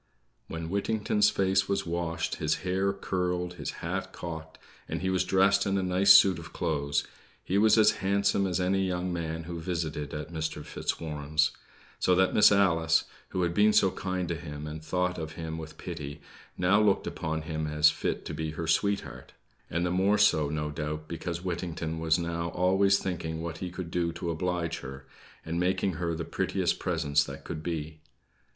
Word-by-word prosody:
When 80 0 -5
Whittington's 105 +1 +2
face 95 -2 +1
was 100 - 0
washed, 85 0 -2
his - - +1
hair 95 +2 +1
curled, 90 -2 -2
his - - -3 0.2
hat - - -3
cocked, 80 -2 -7 0.3
and - - -3
he 95 - +1
was 95 -1 +2
dressed 95 +2 +3
in 100 0 +1
a 95 - 0
nice 95 +2 +4
suit 95 -3 +8
of 80 -2 -10
clothes, 70 0 0 0.4
he 95 +2 +1
was 110 +1 +5
as 110 -1 +6
handsome 100 0 +1
as 90 -1 -1
any 95 +1 +1
young 90 0 -2
man 80 -1 -3
who 85 +1 -6
visited 80 -4 -3
at 75 +2 -6
Mr. 80 -2 -3
Fitzwarren's; 75 -1 -1 0.5
so 90 - +3
that 95 +1 +3
Miss 105 - +7
Alice, 85 -5 +3 0.3
who 90 - -1
had 85 -1 0
been 105 +3 +4
so 95 -2 +4
kind 95 -2 -3
to - - 0
him, 75 -2 -7
and 75 +1 -7
thought 90 +2 -1
of 80 0 -5
him 80 0 -5
with 80 -1 -9
pity, 75 -4 -6 0.4
now 95 +4 +4
looked 100 -2 +3
upon 80 0 -3
him 80 -1 -3
as 75 +1 +5
fit 80 - -3
to - - -5
be 80 -1 -3
her 80 +1 -4
sweetheart; 100 +5 -1 0.4
and 85 +2 0
the 90 - 0
more 95 +3 +3
so, 80 -8 +4
no 75 0 -2
doubt, 75 +1 -4
because 85 +1 -4
Whittington 85 -3 -3
was 80 -1 +2
now 85 0 -2
always 95 +3 +3
thinking 80 -4 -3
what 80 -1 -5
he 90 - -4
could 90 -1 -6
do 85 -1 0
to 85 -1 -3
oblige 85 0 -2
her, 65 +1 -9 0.4
and 85 +1 -2
making 95 +1 +1
her 85 -1 0
the 80 0 -4
prettiest - - -1
presents 70 0 +1
that 70 -2 -8
could 80 -2 -5
be. 80 -2 -4
85 Hz, 185 wpm, -29 LUFS, 80-95 Hz, 0.5 s, suit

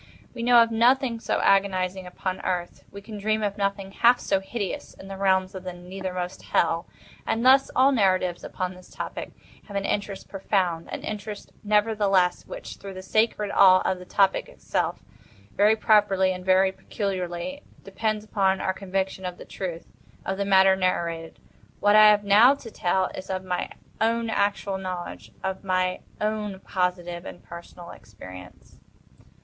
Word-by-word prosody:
We 240 - -6
know 240 0 +6
of 230 - -4
nothing 240 +1 +3
so - - -1
agonizing 190 -1 +1
upon 185 +1 -4
Earth—we 180 +2 -4
can 210 0 -8
dream 215 +1 0
of 200 -1 -1
nothing 200 -1 -2
half 240 +4 +4
so 195 - 0
hideous 195 0 -5
in 195 - -12
the 195 - -6
realms 190 -1 +1
of 190 -1 -7
the 185 -1 -5
nethermost 180 0 -6
Hell. 165 0 0 0.4
And 230 +2 0
thus 265 +1 +6
all 265 +2 +5
narratives 185 -7 +1
upon 185 0 -4
this 180 0 -16
topic - - -6 0.4
have 205 - -9
an 195 - -2
interest 200 -1 -3
profound; 185 -4 -1
an - - -5
interest, 210 0 -6
nevertheless, 205 -4 +2
which, - - -8
through 195 -1 -9
the 185 - -8
sacred 210 0 +1
awe 185 -1 +6
of 185 -1 0
the 180 - -10
topic 195 +1 +1
itself, - - -3 0.5
very 210 +2 +4
properly 205 -4 +3
and 180 0 -8
very 190 +1 +4
peculiarly 190 +6 -4 0.2
depends 215 +2 -2
upon 195 -3 +1
our 190 - -1
conviction 190 0 -3
of 180 -1 -5
the - - -11
truth 175 -3 -6 0.4
of 190 +1 -3
the 200 - 0
matter 190 -1 +5
narrated. 170 -3 -2 0.4
What 205 0 +4
I 215 0 +9
have 210 -1 +4
now 215 +7 +6
to 235 -5 -11
tell 185 0 0
is 185 - -8
of 185 -1 -3
my 180 -1 -2 0.3
own 230 0 +1
actual 200 -2 0
knowledge—of 185 +1 -6
my 185 -1 0 0.2
own 210 -2 -2
positive 175 -2 -2
and - - -10
personal 170 0 -11
experience. 90 -3 -13
195 Hz, 160 wpm, -25 LUFS, 185-210 Hz, 0.5 s, I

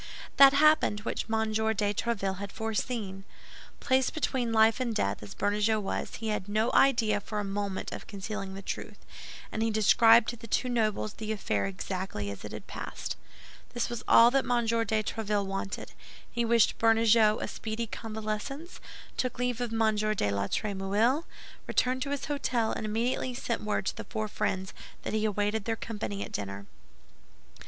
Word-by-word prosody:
That 275 0 +9
happened 305 -7 +4
which 220 - -3
M. 220 -1 0
de 220 -1 +1
Tréville 200 -4 -1
had 200 0 -5
foreseen. 220 -3 -3 0.6
Placed 260 +1 +1
between 260 -6 0
life 220 +1 +4
and 240 -3 -1
death, 100 - 0
as 105 -1 -9
Bernajoux 210 +2 +1
was, 200 - -3
he 225 0 -4
had 210 -2 -2
no 215 +3 +1
idea 225 -6 +4
for 210 +1 -4
a - - -1
moment 200 -1 -3
of - - -7
concealing 195 -1 -5
the 195 - -8
truth; - - -5 0.5
and 220 - -3
he 225 - +2
described 225 +2 +6
to 240 - -4
the 230 0 -11
two 250 +3 0
nobles 215 -3 0
the 220 0 -5
affair 105 - -1
exactly 105 - -4
as 100 - -9
it - - -7
had - - -8
passed. - - -5 0.6
This 240 - 0
was 240 -2 -4
all 235 +1 +8
that 270 0 +3
M. 240 -1 +1
de 225 -1 +1
Tréville 210 -2 -1
wanted. 195 0 -4 0.4
He 235 0 0
wished 230 -1 +3
Bernajoux 225 -1 +5
a - - -3
speedy 220 +1 -4
convalescence, 220 - -5 0.4
took 255 -2 -1
leave 245 -1 -1
of 240 -2 -2
M. 225 -1 +2
de 210 - 0
la 100 0 -1
Trémouille, 210 - 0 0.4
returned 255 +1 +1
to 275 - -2
his 285 -1 -2
hôtel, 255 -6 0
and 215 - -3
immediately 240 +3 -1
sent 235 -2 -2
word 210 -2 -1
to - - -1
the - - -7
four 215 -2 -3
friends 190 -2 -2 0.3
that - - -4
he 215 0 +1
awaited 210 0 0
their 225 - 0
company 210 -3 -4
at - - -12
dinner. 100 -1 -5
220 Hz, 175 wpm, -29 LUFS, 205-235 Hz, 0.6 s, That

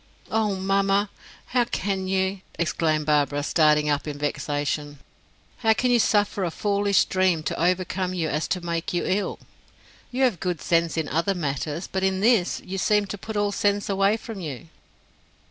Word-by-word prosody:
"Oh, 215 -2 +1
mamma, 195 +1 +1 0.3
how 245 -1 +1
can 195 -4 -2
you!" 190 0 0 0.2
exclaimed 155 -2 0
Barbara, 145 -1 +2
starting 150 -1 +3
up 145 0 0
in 145 -1 -4
vexation. 145 0 -2 0.6
"How 225 -2 +3
can 250 +3 +1
you 240 - +4
suffer 205 -2 +2
a 175 - 0
foolish 200 +2 +2
dream 185 -4 +1
to - - -3
overcome 185 +1 0
you 165 -3 -1
as 150 +1 -1
to 180 -2 -2
make 170 0 -2
you 175 - 0
ill? 200 +2 -1 0.7
You 255 +2 0
have 235 -10 +2
good 180 -3 -2
sense 165 +1 +1
in 160 -2 -1
other 170 +7 0
matters, 150 +1 -3
but, 190 - -3
in 190 0 +1
this, 215 -3 +2
you 190 +1 -4
seem 210 +2 +2
to 205 - -6
put 220 +1 -5
all 205 0 +1
sense 205 -1 0
away 195 +2 +2
from 225 -2 -8
you." 135 - -7
185 Hz, 175 wpm, -24 LUFS, 155-200 Hz, 0.7 s, you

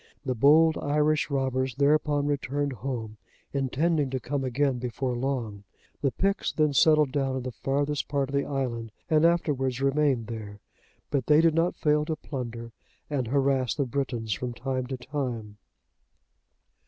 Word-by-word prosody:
The 130 - 0
bold 155 +6 +5
Irish 150 +1 +1
robbers 130 -2 -1
thereupon 145 0 +2
returned 145 0 -1
home, 115 -2 -5 0.4
intending 145 +2 +1
to 130 0 -2
come 135 +2 -3
again 130 0 0
before 125 +1 -2
long. 120 -6 -3 0.4
The 140 - +2
Picts 195 +9 0
then 150 -2 +1
settled 150 0 +5
down 135 -2 0
in 130 - -3
the 130 - -4
farthest 140 +4 -1
part 140 -2 0
of 135 - -9
the 140 0 +2
island 120 -5 -3 0.2
and 155 +1 +5
afterwards 135 -7 0
remained 135 -3 +2
there, 105 -3 -7 0.5
but 135 -4 0
they 150 0 +6
did 165 -1 +4
not 165 +2 +1
fail 150 0 +2
to 160 - -2
plunder 120 -6 -6 0.4
and 130 -5 -1
harass 135 -1 +1
the 140 - 0
Britons 120 -4 -2
from 125 +3 -4
time 130 0 -3
to 130 0 -4
time. 125 -6 -4
135 Hz, 155 wpm, -27 LUFS, 125-145 Hz, 0.5 s, they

